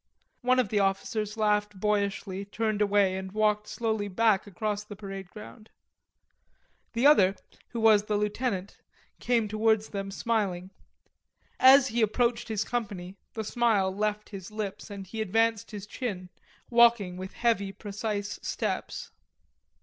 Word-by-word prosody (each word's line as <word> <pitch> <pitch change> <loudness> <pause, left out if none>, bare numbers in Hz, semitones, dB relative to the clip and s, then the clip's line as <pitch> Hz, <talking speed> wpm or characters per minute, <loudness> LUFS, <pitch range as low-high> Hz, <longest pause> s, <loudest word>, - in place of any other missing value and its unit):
One 255 +1 +3
of 250 -6 +2
the 210 - +1
officers 210 +2 -1
laughed 210 -2 +1
boyishly, 200 -1 -1
turned 215 +1 -2
away 200 -2 +3
and 190 0 -5
walked 210 0 +1
slowly 220 -1 -2
back 205 0 +2
across 205 +2 -3
the 210 0 -10
parade 195 -2 -8
ground. 215 +2 -12 1.2
The 235 +3 +1
other, 200 -10 +6 0.3
who 235 - -5
was 220 -2 +6
the 210 -1 0
lieutenant, 210 -2 -2 0.4
came 235 -3 +1
towards 215 0 +1
them 195 -1 -4
smiling. 195 -4 -1 0.9
As 265 0 +7
he 235 +1 0
approached 235 +2 +1
his 215 -2 -1
company, 200 -7 -4 0.2
the 220 - -2
smile 210 -4 +1
left 210 +1 -2
his 195 -2 -8
lips 210 -1 -5
and 200 -1 -7
he 220 +4 -5
advanced 225 +1 +1
his 205 -2 -7
chin, 200 -5 -5 0.4
walking 235 -6 +5
with 185 +1 -7
heavy 225 -5 +1
precise 205 0 -4
steps. - - -3
210 Hz, 140 wpm, -28 LUFS, 195-225 Hz, 1.2 s, As